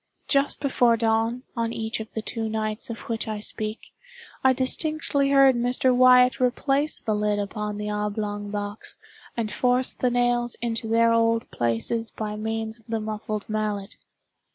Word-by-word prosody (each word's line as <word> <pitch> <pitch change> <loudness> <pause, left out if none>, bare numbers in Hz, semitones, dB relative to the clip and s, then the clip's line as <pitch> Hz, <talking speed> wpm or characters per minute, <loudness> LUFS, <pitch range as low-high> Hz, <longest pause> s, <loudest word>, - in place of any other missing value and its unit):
Just 275 +1 +2
before 245 -4 +3
dawn, 225 +2 0
on 230 -1 -1
each 225 -1 -3
of 220 - -8
the 220 - -4
two 225 -1 -3
nights 215 +1 -3
of 230 - -6
which 225 -1 -4
I 215 -1 -3
speak, 215 +1 -4 0.5
I 265 - +6
distinctly 280 +2 +1
heard 275 -2 +6
Mr. 245 +1 +3
Wyatt 250 0 +6
replace 275 +4 +1
the 220 - -2
lid 210 0 0
upon 210 +1 -3
the 210 0 -3
oblong 210 0 -3
box, 205 0 -4 0.4
and 220 -2 -2
force 250 0 +1
the 250 - 0
nails 245 0 +1
into 230 -1 -2
their 230 +1 +3
old 230 0 +1
places 120 - -1
by 210 -1 -5
means 220 +1 -3
of 225 - -26
the 225 -1 -1
muffled 215 0 -4
mallet. 210 -2 -3
225 Hz, 160 wpm, -25 LUFS, 215-245 Hz, 0.5 s, I